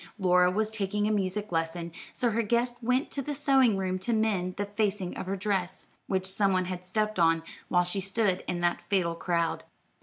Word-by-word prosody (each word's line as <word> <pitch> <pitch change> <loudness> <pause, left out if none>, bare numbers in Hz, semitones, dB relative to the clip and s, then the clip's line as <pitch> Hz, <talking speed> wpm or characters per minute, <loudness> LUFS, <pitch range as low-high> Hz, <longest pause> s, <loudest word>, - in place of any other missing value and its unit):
Laura 180 -2 +4
was 215 +3 0
taking 205 -1 -1
a - - +1
music 205 0 -1
lesson, 165 +1 -2 0.2
so 240 -2 0
her 230 +2 +1
guest 240 +2 0
went 250 +4 +1
to 280 - -2
the 290 +2 -4
sewing 270 -6 +4
room 185 -1 -1
to 235 +6 -1
mend 200 -5 0
the 205 - -2
facing 205 -2 -1
of - - -5
her 195 - -1
dress, 190 -2 -2 0.2
which 190 -1 0
some 195 +1 +2
one 185 -1 +1
had 180 0 -5
stepped 215 +2 -1
on 165 -1 +4 0.2
while 180 -1 +3
she 180 +3 -2
stood 195 -1 0
in 175 -1 -2
that 175 0 +1
fatal 180 -4 0
crowd. 170 -1 -1
195 Hz, 205 wpm, -28 LUFS, 180-215 Hz, 0.2 s, Laura